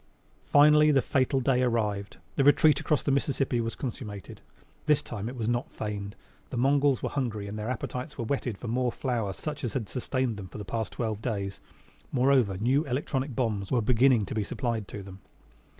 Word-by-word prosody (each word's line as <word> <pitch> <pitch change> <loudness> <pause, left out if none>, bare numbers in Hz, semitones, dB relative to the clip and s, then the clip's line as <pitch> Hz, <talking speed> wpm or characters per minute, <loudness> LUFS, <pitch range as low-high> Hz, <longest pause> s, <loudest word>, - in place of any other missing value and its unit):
Finally 150 +1 +6
the 140 -2 +5
fatal 130 +1 +1
day 130 -1 +2
arrived. 105 -5 -1 0.2
The 140 - +2
retreat 145 +1 +5
across 150 - 0
the 140 - +1
Mississippi 135 -3 +1
was 115 0 -3
consummated. 110 -6 -6 0.5
This 150 -2 +4
time 110 0 -5
it 130 - -7
was 115 -3 -3
not 120 +1 0
feigned. 105 -1 -5 0.3
The - - -4
Mongols 140 +1 +3
were - - 0
hungry, 115 -7 -2
and 100 - -6
their 110 +2 -4
appetites 125 +3 -4
were 115 - -3
whetted 125 -4 -2
for 120 - -7
more 125 +2 +1
flour 115 -5 -2
such 150 +8 -6
as 120 -4 -2
had 115 -6 -2
sustained 125 -1 -2
them 95 -2 -7
for 90 - -10
the 105 - -6
past 110 0 -3
twelve 110 -3 -3
days. 100 -4 -3 0.5
Moreover, 130 -7 +3
new 130 +8 +2
electronic 135 0 -2
bombs 105 -6 -1
were 125 - +3
beginning 120 0 +4
to - - -5
be 110 - 0
supplied 115 -1 -2
them. 95 -2 -9
120 Hz, 190 wpm, -28 LUFS, 105-135 Hz, 0.5 s, Finally